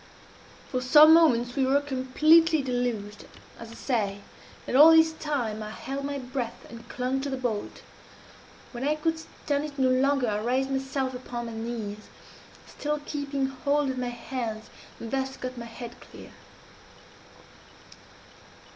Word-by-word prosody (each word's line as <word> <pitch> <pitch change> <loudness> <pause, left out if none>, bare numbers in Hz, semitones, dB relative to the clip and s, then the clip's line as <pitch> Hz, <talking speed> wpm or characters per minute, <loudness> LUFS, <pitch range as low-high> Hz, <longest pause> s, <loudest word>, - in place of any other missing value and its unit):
"For 255 - -1
some 300 +5 +8
moments 245 -7 +4
we 275 - +1
were 270 +2 +3
completely 295 +4 +3
deluged, 240 -5 -3 0.3
as 230 - -9
I - - -11
say, 205 -7 -2 0.4
and - - -3
all 300 +4 +9
this 320 0 +5
time 250 -9 -3
I 215 - -6
held 275 +4 -5
my 285 0 -3
breath, 250 -2 -5
and 235 0 -12
clung 255 +1 -2
to 285 - -3
the 265 - -3
bolt. 235 -5 -4 0.9
When 245 0 -6
I 295 +2 +1
could 320 +1 -1
stand 290 -2 -3
it 290 -1 -9
no 260 -1 +3
longer 265 0 +2
I 210 -1 -1
raised 260 +3 0
myself 265 0 -2
upon 245 -1 -6
my 230 - -7
knees, 225 -2 -6 0.6
still 300 0 -3
keeping 280 -2 -2
hold 280 +2 0
with 260 -1 -3
my 250 - -2
hands, 235 -2 -5 0.3
and 230 - -7
thus 265 0 -2
got 255 0 -6
my 235 -1 -7
head 240 +1 -9
clear. - - -13
260 Hz, 155 wpm, -27 LUFS, 240-285 Hz, 0.9 s, all